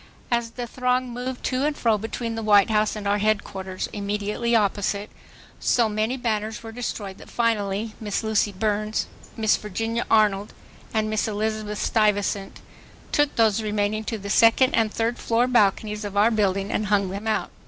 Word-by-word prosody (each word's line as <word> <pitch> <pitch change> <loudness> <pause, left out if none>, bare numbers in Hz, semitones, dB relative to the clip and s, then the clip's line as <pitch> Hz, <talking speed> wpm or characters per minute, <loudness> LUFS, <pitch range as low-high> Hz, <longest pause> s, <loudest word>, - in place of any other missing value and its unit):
As 235 -1 +1
the 245 +1 -5
throng 250 +1 0
moved 250 +1 -5
to 255 +1 0
and 300 0 0
fro 225 -2 +2
between 230 +2 -4
the 225 - -3
White 205 -1 +5
House 215 0 +2
and 205 -1 -4
our 205 +1 +2
Headquarters 195 -3 -1
immediately 210 +3 -1
opposite, 205 -1 0 0.5
so 235 -2 +3
many 215 +4 -1
banners 220 -2 -2
were 225 - -7
destroyed 210 -4 -5
that - - -13
finally 215 -2 0
Miss 210 0 -2
Lucy 220 -1 +1
Burns, 215 +2 -1 0.3
Miss 220 -1 +3
Virginia 225 +3 -3
Arnold 210 -2 +2 0.4
and 220 -1 0
Miss 215 0 0
Elizabeth 215 0 -2
Stuyvesant 205 -2 0 0.5
took 295 -1 +2
those 225 -2 +3
remaining 210 0 -1
to 225 - -3
the 200 -1 -5
second 230 +4 +5
and 225 -2 +2
third 230 +2 -1
floor 235 +1 +2
balconies 210 -3 +2
of 200 -1 -5
our 215 +3 +5
building 200 -2 0
and 215 - -1
hung 200 -2 +2
them 200 +3 -5
out. 220 - 0
215 Hz, 170 wpm, -24 LUFS, 205-230 Hz, 0.5 s, White